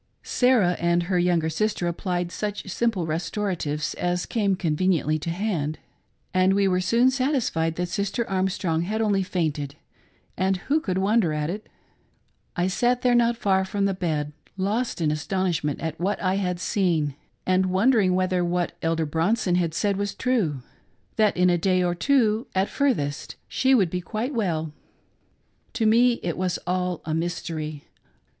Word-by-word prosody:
Sarah 240 Hz, -9 st, +3 dB
and 170 Hz, 0 st, +2 dB
her 180 Hz, +1 st, 0 dB
younger 175 Hz, -2 st, +2 dB
sister 185 Hz, +3 st, -1 dB
applied 175 Hz, 0 st, -2 dB
such 205 Hz, 0 st, -4 dB
simple 195 Hz, -2 st, 0 dB
restoratives 165 Hz, -1 st, -2 dB
as 175 Hz, 0 st, -1 dB
came 200 Hz, -4 st, +1 dB
conveniently 160 Hz, -2 st, +1 dB
to 155 Hz, -, -4 dB
hand, 165 Hz, -5 st, -2 dB, 0.6 s
and 185 Hz, +1 st, +3 dB
we 200 Hz, -1 st, +3 dB
were 185 Hz, -1 st, +1 dB
soon 235 Hz, +8 st, +3 dB
satisfied 255 Hz, -, 0 dB
that 180 Hz, +1 st, -2 dB
Sister 200 Hz, +6 st, -2 dB
Armstrong 185 Hz, -3 st, 0 dB
had 210 Hz, +6 st, -2 dB
only 205 Hz, -3 st, +2 dB
fainted; 155 Hz, -6 st, -2 dB, 0.6 s
and 190 Hz, 0 st, +1 dB
who 280 Hz, -, 0 dB
could 185 Hz, -10 st, -2 dB
wonder 195 Hz, -3 st, +2 dB
at 150 Hz, +1 st, -1 dB
it 210 Hz, +3 st, -7 dB, 0.4 s
} -, -, -43 dB
I 175 Hz, -, +2 dB
sat 240 Hz, +6 st, +1 dB
there, 250 Hz, -1 st, +4 dB
not 235 Hz, -1 st, +3 dB
far 190 Hz, -3 st, +2 dB
from 200 Hz, +1 st, -1 dB
the 195 Hz, -, +1 dB
bed, 155 Hz, -5 st, -2 dB, 0.2 s
lost 205 Hz, +2 st, -1 dB
in 155 Hz, -2 st, +2 dB
astonishment 160 Hz, -1 st, -1 dB
at 160 Hz, -1 st, -4 dB
what 195 Hz, +4 st, -1 dB
I 185 Hz, 0 st, 0 dB
had 180 Hz, -3 st, -1 dB
seen, 170 Hz, -7 st, 0 dB, 0.3 s
and 185 Hz, 0 st, +2 dB
wondering 190 Hz, 0 st, +3 dB
whether 185 Hz, -1 st, +1 dB
what 175 Hz, 0 st, -1 dB
Elder 165 Hz, 0 st, 0 dB
Bronson 175 Hz, +6 st, +1 dB
had 170 Hz, -3 st, +1 dB
said 200 Hz, 0 st, +1 dB
was 205 Hz, 0 st, -2 dB
true 185 Hz, -, 0 dB, 0.2 s
— -, -, -40 dB
that 215 Hz, -3 st, +3 dB
in 180 Hz, 0 st, +4 dB
a 175 Hz, -, +2 dB
day 185 Hz, +1 st, +2 dB
or 175 Hz, -1 st, +1 dB
two, 225 Hz, +2 st, +2 dB
at 190 Hz, +1 st, +1 dB
furthest, 190 Hz, -, -1 dB
she 265 Hz, 0 st, +3 dB
would 190 Hz, -9 st, +2 dB
be 180 Hz, -, -2 dB
quite 225 Hz, +9 st, -3 dB
well. 165 Hz, -, -1 dB, 1.0 s
To 225 Hz, -, 0 dB
me 240 Hz, +3 st, +5 dB
it 170 Hz, -, -2 dB
was 180 Hz, -1 st, 0 dB
all 180 Hz, -1 st, -1 dB
a 155 Hz, -, -2 dB
mystery. 160 Hz, -3 st, -3 dB
185 Hz, 165 wpm, -25 LUFS, 165-210 Hz, 1.0 s, me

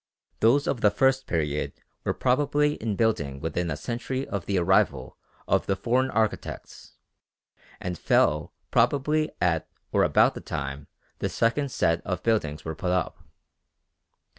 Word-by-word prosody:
Those 135 Hz, +7 st, +4 dB
of 130 Hz, -9 st, -1 dB
the 105 Hz, -, +6 dB
first 135 Hz, +5 st, +2 dB
period 75 Hz, -3 st, -1 dB, 0.3 s
were -, -, 0 dB
probably 145 Hz, +3 st, +2 dB
in 110 Hz, -6 st, -3 dB
building 70 Hz, -12 st, 0 dB
within 85 Hz, +3 st, -2 dB
a 75 Hz, -, -2 dB
century 125 Hz, -, -3 dB
of 100 Hz, -3 st, -4 dB
the 100 Hz, -, +1 dB
arrival 90 Hz, +2 st, +2 dB, 0.3 s
of -, -, +1 dB
the 95 Hz, -, +1 dB
foreign 125 Hz, +6 st, +1 dB
architects; 110 Hz, -2 st, -3 dB, 0.9 s
and 90 Hz, -2 st, -4 dB
fell 75 Hz, 0 st, +2 dB, 0.2 s
probably 145 Hz, +6 st, +2 dB
at 85 Hz, -2 st, +1 dB, 0.2 s
or -, -, +3 dB
about -, -, +4 dB
the -, -, -8 dB
time 70 Hz, +1 st, -5 dB, 0.3 s
the -, -, -1 dB
second 135 Hz, +5 st, +1 dB
set 85 Hz, -6 st, +1 dB
of 90 Hz, 0 st, -3 dB
buildings 80 Hz, -10 st, 0 dB
were 80 Hz, -, -3 dB
put 90 Hz, +3 st, -3 dB
up. 90 Hz, -2 st, -1 dB
105 Hz, 145 wpm, -26 LUFS, 85-130 Hz, 0.9 s, the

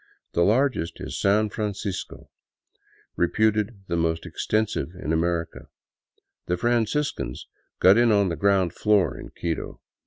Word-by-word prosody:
The 85 Hz, -, 0 dB
largest 110 Hz, -, +1 dB
is -, -, -6 dB
San 105 Hz, +2 st, +2 dB
Fran 105 Hz, -3 st, -2 dB
cisco, 100 Hz, -2 st, -6 dB, 0.8 s
reputed 105 Hz, +3 st, +1 dB
the 85 Hz, -, -1 dB
most 80 Hz, -1 st, 0 dB
extensive 110 Hz, -5 st, -1 dB
in 80 Hz, -3 st, -3 dB
America. 85 Hz, 0 st, -1 dB, 0.8 s
The 90 Hz, -, 0 dB
Franciscans 120 Hz, -, -1 dB, 0.3 s
got 95 Hz, +5 st, +6 dB
in 120 Hz, -1 st, +4 dB
on 100 Hz, -2 st, +3 dB
the 85 Hz, -, -2 dB
ground 95 Hz, -3 st, +2 dB
floor 105 Hz, -6 st, +2 dB
in -, -, -9 dB
Quito. 85 Hz, -2 st, -4 dB
100 Hz, 130 wpm, -25 LUFS, 85-110 Hz, 0.8 s, got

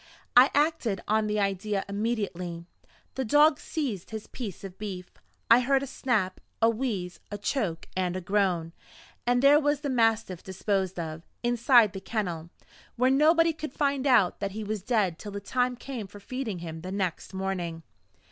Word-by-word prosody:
I 250 Hz, +2 st, +8 dB
acted 290 Hz, -, +1 dB
on 215 Hz, 0 st, +2 dB
the 210 Hz, 0 st, 0 dB
idea 195 Hz, 0 st, -1 dB
immediately; 200 Hz, -5 st, -3 dB, 0.5 s
the 265 Hz, -, -2 dB
dog 295 Hz, +5 st, +5 dB
seized 255 Hz, -, -4 dB
his 220 Hz, -1 st, -6 dB
piece 210 Hz, -9 st, -7 dB
of 190 Hz, -1 st, -9 dB
beef; 190 Hz, -4 st, -6 dB, 0.4 s
I 230 Hz, -, +7 dB
heard 270 Hz, +2 st, +2 dB
a -, -, -2 dB
snap, 235 Hz, -8 st, -1 dB, 0.2 s
a 225 Hz, 0 st, +5 dB
wheeze, 215 Hz, -7 st, -3 dB
a 205 Hz, -, -4 dB
choke, 205 Hz, -, -2 dB
and 185 Hz, -1 st, 0 dB
a -, -, -1 dB
groan 180 Hz, -4 st, 0 dB, 0.5 s
and 245 Hz, +1 st, +3 dB
there 285 Hz, +2 st, +7 dB
was 290 Hz, -1 st, +1 dB
the 285 Hz, -3 st, -2 dB
mastiff 225 Hz, -7 st, +1 dB
disposed 190 Hz, -1 st, -2 dB
of, 160 Hz, -1 st, -5 dB, 0.2 s
inside 240 Hz, -2 st, +5 dB
the 195 Hz, -, -6 dB
kennel, 175 Hz, -8 st, -3 dB, 0.5 s
where 255 Hz, +2 st, +3 dB
nobody 325 Hz, +4 st, +4 dB
could 310 Hz, -3 st, -6 dB
find 280 Hz, -1 st, 0 dB
out 225 Hz, -9 st, +4 dB
that 200 Hz, -1 st, -3 dB
he 215 Hz, +1 st, -4 dB
was 210 Hz, -1 st, -3 dB
dead 195 Hz, -6 st, 0 dB
till 205 Hz, -2 st, -7 dB
the 200 Hz, -, -3 dB
time 250 Hz, +5 st, 0 dB
came 245 Hz, -4 st, -6 dB
for 205 Hz, +1 st, -12 dB
feeding 230 Hz, -1 st, -4 dB
him 160 Hz, 0 st, -6 dB
the 185 Hz, +2 st, -6 dB
next 190 Hz, -4 st, -2 dB
morning. 185 Hz, -4 st, -3 dB
210 Hz, 175 wpm, -28 LUFS, 185-255 Hz, 0.5 s, I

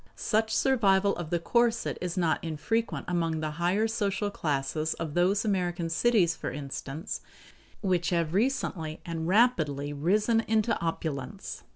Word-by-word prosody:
Such 220 Hz, -, 0 dB
survival 200 Hz, -7 st, +3 dB
of 175 Hz, -3 st, -5 dB
the 175 Hz, -, +1 dB
corset 235 Hz, +6 st, +1 dB
is 180 Hz, 0 st, -3 dB
not 165 Hz, -3 st, +1 dB
infrequent 195 Hz, +9 st, -2 dB
among 165 Hz, -3 st, 0 dB
the 155 Hz, -1 st, -2 dB
higher 195 Hz, +6 st, +2 dB
social 205 Hz, -2 st, -1 dB
classes 155 Hz, -1 st, -1 dB
of 160 Hz, -3 st, -5 dB
those 190 Hz, +5 st, +2 dB
American 175 Hz, -4 st, -1 dB
cities, 180 Hz, -3 st, +3 dB
for -, -, -4 dB
instance, 140 Hz, -, -5 dB, 0.6 s
which 180 Hz, -4 st, +1 dB
have 170 Hz, -2 st, 0 dB
recently 190 Hz, -, -1 dB
and 165 Hz, -1 st, -3 dB
rapidly 155 Hz, -, +2 dB
risen 210 Hz, +10 st, +2 dB
into 220 Hz, +1 st, +2 dB
opulence. 165 Hz, +1 st, -4 dB
175 Hz, 140 wpm, -28 LUFS, 160-215 Hz, 0.6 s, survival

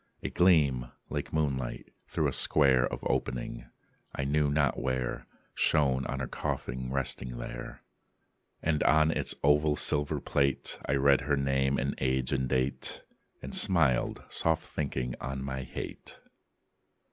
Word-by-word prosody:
A -, -, -3 dB
gleam, 70 Hz, -9 st, +3 dB, 0.2 s
like -, -, -4 dB
moonlight, 70 Hz, -5 st, -2 dB
through -, -, 0 dB
a -, -, -1 dB
square 65 Hz, -4 st, +4 dB
Of -, -, -6 dB
opening -, -, -3 dB, 0.5 s
I -, -, -2 dB
knew 75 Hz, +1 st, +1 dB
not 70 Hz, -2 st, +1 dB
where 65 Hz, -1 st, -2 dB, 0.3 s
Shone 65 Hz, -4 st, +2 dB
on 70 Hz, -, -3 dB
her 65 Hz, -, -2 dB
coffin 65 Hz, +1 st, -4 dB
resting 65 Hz, -2 st, -2 dB
there. -, -, -7 dB, 0.8 s
And 80 Hz, -2 st, +1 dB
on 75 Hz, +2 st, +4 dB
its -, -, 0 dB
oval 75 Hz, +1 st, +4 dB
silver 75 Hz, 0 st, +2 dB
plate 70 Hz, -2 st, 0 dB
I 65 Hz, -, +1 dB
read 70 Hz, 0 st, +4 dB
her 70 Hz, -1 st, 0 dB
name 65 Hz, 0 st, +1 dB
and 70 Hz, +2 st, -1 dB
age 65 Hz, -1 st, 0 dB
and 65 Hz, -2 st, 0 dB
date, 65 Hz, +1 st, -1 dB, 0.4 s
And -, -, -7 dB
smiled, 80 Hz, -10 st, +2 dB
soft 80 Hz, -1 st, +1 dB
thinking 65 Hz, -4 st, -3 dB
on 65 Hz, 0 st, -4 dB
my 65 Hz, -1 st, -4 dB
hate. 65 Hz, -, -8 dB
70 Hz, 140 wpm, -29 LUFS, 65-75 Hz, 0.8 s, square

